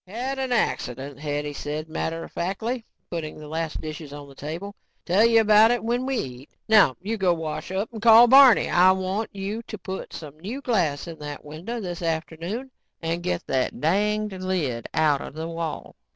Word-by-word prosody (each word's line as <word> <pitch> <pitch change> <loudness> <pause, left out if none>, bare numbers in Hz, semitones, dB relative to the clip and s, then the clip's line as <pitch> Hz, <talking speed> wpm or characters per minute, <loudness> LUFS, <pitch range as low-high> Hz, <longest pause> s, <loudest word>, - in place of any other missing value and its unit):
"Had 255 +7 -4
an 260 -1 -2
accident," 135 - -1
Hetty 145 0 -3
said 150 +2 -4
matter 165 +1 -3
of - - -10
factly, 220 +7 -3 0.3
putting 160 -3 -4
the 155 -1 -10
last 160 +1 -3
dishes 155 -1 -7
on 145 0 -9
the 140 - -14
table. 165 +9 -6 0.3
"Tell 185 +5 +4
you 230 -1 +6
about 215 +1 +6
it 240 -1 0
when 240 +3 -1
we 270 -1 0
eat. 130 - -6 0.2
Now 210 - +6
you 220 +3 -2
go 185 -3 +2
wash 160 +1 -5
up 200 +5 -2
and 220 - -7
call 230 +1 +9
Barney. 260 -1 +7
I 185 +1 +5
want 190 +3 -2
you 200 +3 -4
to 220 -2 -8
put 190 0 -6
some 155 -1 -9
new 215 +11 -5
glass 185 - 0
in 165 -1 -8
that 145 -1 -7
window 170 +11 -6
this 180 -4 -5
afternoon 170 +9 -3 0.3
and 165 +1 -2
get 180 0 -2
that 130 -1 -1
danged 205 +3 0
lid 155 -11 -2
outta 150 -3 +1
the 160 +3 -6
wall." 165 -1 -5
180 Hz, 190 wpm, -25 LUFS, 155-220 Hz, 0.3 s, call